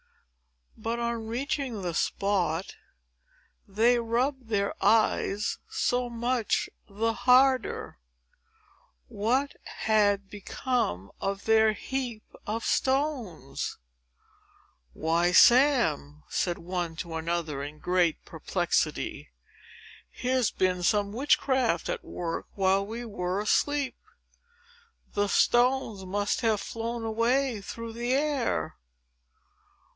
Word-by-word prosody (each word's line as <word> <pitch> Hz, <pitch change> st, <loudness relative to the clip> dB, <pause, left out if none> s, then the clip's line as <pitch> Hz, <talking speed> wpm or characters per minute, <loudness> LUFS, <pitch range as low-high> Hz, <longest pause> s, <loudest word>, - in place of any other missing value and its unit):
But, 225 Hz, +2 st, -3 dB
on 235 Hz, -1 st, -2 dB
reaching 250 Hz, -2 st, -3 dB
the 175 Hz, -2 st, -2 dB
spot, 185 Hz, -2 st, 0 dB, 0.9 s
they 230 Hz, +5 st, +3 dB
rubbed 245 Hz, +3 st, -1 dB
their 200 Hz, -3 st, 0 dB
eyes 210 Hz, -2 st, +2 dB
so 245 Hz, 0 st, 0 dB
much 235 Hz, 0 st, -1 dB, 0.2 s
the 225 Hz, +3 st, -1 dB
harder. 250 Hz, -, +3 dB, 1.1 s
What 255 Hz, +7 st, 0 dB, 0.3 s
had 205 Hz, -2 st, +3 dB
become 205 Hz, -, -2 dB
of 195 Hz, 0 st, -3 dB
their 220 Hz, -1 st, +4 dB
heap 245 Hz, -2 st, -4 dB, 0.2 s
of 220 Hz, +2 st, -2 dB
stones! 260 Hz, -, -1 dB, 1.2 s
"Why, 170 Hz, +2 st, +1 dB
Sam," 230 Hz, -, +4 dB
said 175 Hz, -2 st, -1 dB
one 175 Hz, -1 st, -4 dB
to 170 Hz, 0 st, -6 dB
another, 160 Hz, -3 st, -2 dB
in 145 Hz, +2 st, -7 dB
great 175 Hz, 0 st, +1 dB
perplexity, -, -, -2 dB, 0.8 s
"here's 255 Hz, -2 st, 0 dB
been 185 Hz, -1 st, 0 dB
some 200 Hz, +2 st, +2 dB
witchcraft 260 Hz, -, +1 dB
at -, -, -3 dB
work, 165 Hz, -2 st, -4 dB
while 195 Hz, 0 st, +2 dB
we 230 Hz, +4 st, -6 dB
were 185 Hz, -3 st, -2 dB
asleep. 280 Hz, +6 st, +1 dB, 1.2 s
The 205 Hz, 0 st, +1 dB
stones 240 Hz, -3 st, +2 dB
must 205 Hz, +4 st, -1 dB
have 220 Hz, -3 st, +2 dB
flown 230 Hz, +2 st, -4 dB
away 230 Hz, +1 st, +1 dB
through 230 Hz, +3 st, -7 dB
the 240 Hz, +2 st, -1 dB
air!" 280 Hz, -3 st, 0 dB
220 Hz, 100 wpm, -28 LUFS, 190-245 Hz, 1.2 s, their